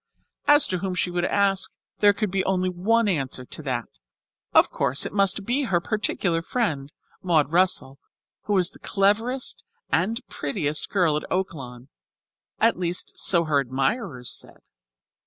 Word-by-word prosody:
As 290 Hz, 0 st, +6 dB
to 185 Hz, -, -1 dB
whom 185 Hz, 0 st, -3 dB
she 180 Hz, 0 st, -1 dB
would 175 Hz, 0 st, 0 dB
ask, 195 Hz, -1 st, +2 dB, 0.3 s
there 205 Hz, -1 st, +6 dB
could 205 Hz, -1 st, -2 dB
be 190 Hz, 0 st, 0 dB
only 185 Hz, -1 st, +1 dB
one 215 Hz, +6 st, +1 dB
answer 135 Hz, -8 st, -1 dB
to 155 Hz, -, -6 dB
that. 125 Hz, -5 st, -2 dB, 0.7 s
Of -, -, +5 dB
course 130 Hz, +3 st, 0 dB
it -, -, -5 dB
must 200 Hz, 0 st, +2 dB
be 265 Hz, +5 st, 0 dB
her 180 Hz, -7 st, +1 dB
particular 175 Hz, -3 st, -1 dB
friend, 155 Hz, -, -2 dB, 0.3 s
Maud 155 Hz, -5 st, +2 dB
Russell, 170 Hz, -6 st, +1 dB, 0.5 s
who 210 Hz, -, -1 dB
was 185 Hz, -3 st, +3 dB
the -, -, -17 dB
cleverest 225 Hz, +6 st, 0 dB, 0.3 s
and 210 Hz, +8 st, +1 dB
prettiest 150 Hz, 0 st, -2 dB
girl 175 Hz, -6 st, +2 dB
at 150 Hz, -, -6 dB
Oaklawn, 135 Hz, -9 st, -4 dB, 0.7 s
at -, -, +3 dB
least 175 Hz, 0 st, -2 dB
so 170 Hz, -3 st, +4 dB
her 150 Hz, -3 st, +2 dB
admirers 135 Hz, -, -2 dB
said. -, -, -7 dB
180 Hz, 155 wpm, -24 LUFS, 150-200 Hz, 0.7 s, As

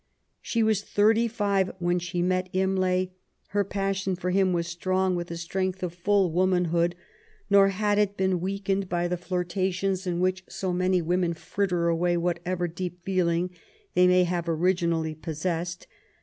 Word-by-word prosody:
She 230 Hz, -1 st, 0 dB
was 220 Hz, -2 st, +2 dB
thirty 220 Hz, +3 st, +3 dB
five 200 Hz, -4 st, 0 dB
when 175 Hz, 0 st, +1 dB
she 175 Hz, 0 st, -2 dB
met 185 Hz, 0 st, 0 dB
Imlay. 185 Hz, -1 st, +1 dB, 0.4 s
Her 205 Hz, +1 st, +1 dB
passion 195 Hz, -1 st, -1 dB
for 180 Hz, +1 st, -2 dB
him 190 Hz, 0 st, +3 dB
was 170 Hz, -1 st, 0 dB
strong 185 Hz, +2 st, 0 dB
with 175 Hz, 0 st, -3 dB
the 170 Hz, -, -6 dB
strength 185 Hz, +2 st, -2 dB
of 175 Hz, -2 st, -2 dB
full 190 Hz, 0 st, +2 dB
womanhood, 175 Hz, -1 st, +2 dB, 0.6 s
nor 200 Hz, -1 st, +7 dB
had 205 Hz, +1 st, +1 dB
it 205 Hz, -1 st, +1 dB
been 190 Hz, -2 st, +1 dB
weakened 195 Hz, 0 st, -1 dB
by 175 Hz, 0 st, 0 dB
the 180 Hz, -, -1 dB
flirtations 185 Hz, +1 st, -2 dB
in 175 Hz, -1 st, -1 dB
which 185 Hz, +1 st, 0 dB
so 185 Hz, -2 st, -3 dB
many 185 Hz, 0 st, +1 dB
women 175 Hz, 0 st, 0 dB
fritter 180 Hz, -1 st, -1 dB
away 175 Hz, +1 st, +1 dB
what 170 Hz, 0 st, 0 dB
ever 180 Hz, -1 st, 0 dB
deep 175 Hz, +1 st, -6 dB
feeling 180 Hz, -2 st, +1 dB, 0.4 s
they 180 Hz, 0 st, +5 dB
may 180 Hz, 0 st, +5 dB
have 175 Hz, -1 st, -2 dB
originally 165 Hz, -1 st, +1 dB
possessed. 165 Hz, +3 st, -4 dB
180 Hz, 165 wpm, -26 LUFS, 175-190 Hz, 0.6 s, nor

